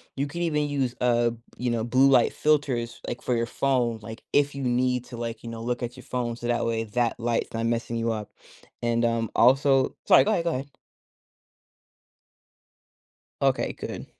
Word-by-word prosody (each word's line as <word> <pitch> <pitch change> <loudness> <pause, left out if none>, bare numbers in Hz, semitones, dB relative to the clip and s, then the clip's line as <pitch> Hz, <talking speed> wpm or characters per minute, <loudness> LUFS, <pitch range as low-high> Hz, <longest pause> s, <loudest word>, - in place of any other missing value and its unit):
you 140 +1 -1
can 170 +4 -5
even 150 -3 0
use, 135 -4 -1
uh, 120 -1 +3 0.3
you 125 -1 -1
know, 115 -1 -1
blue 130 +4 +4
light 125 -3 +4
filters, 130 -6 0
like, 120 - -4
for 125 - 0
your 115 0 0
phone, 125 -3 0
like, 110 +2 -9
if 145 0 +3
you 140 - -4
need 125 0 +1
to, 120 -2 -9
like, 115 -1 -5
you 115 - -6
know, 115 -1 -7
look 120 +1 -2
at 120 +1 -5
your 130 - -11
phone 120 -2 -3
so 120 - -9
that 120 0 +1
way 115 -1 0
that 115 +2 -1
light's 115 0 -1
not 115 0 -1
messing 115 0 -1
you 115 0 0
up, 105 -2 -5 0.5
and, 120 0 +1
um, 115 -1 0
also 135 +2 +4
sorry, - - +7
go 215 - +1
ahead, 175 -6 +1
go 170 - +1
ahead. 135 0 -4 2.7
Okay, - - +1
good. - - -7
120 Hz, 190 wpm, -26 LUFS, 115-135 Hz, 2.7 s, sorry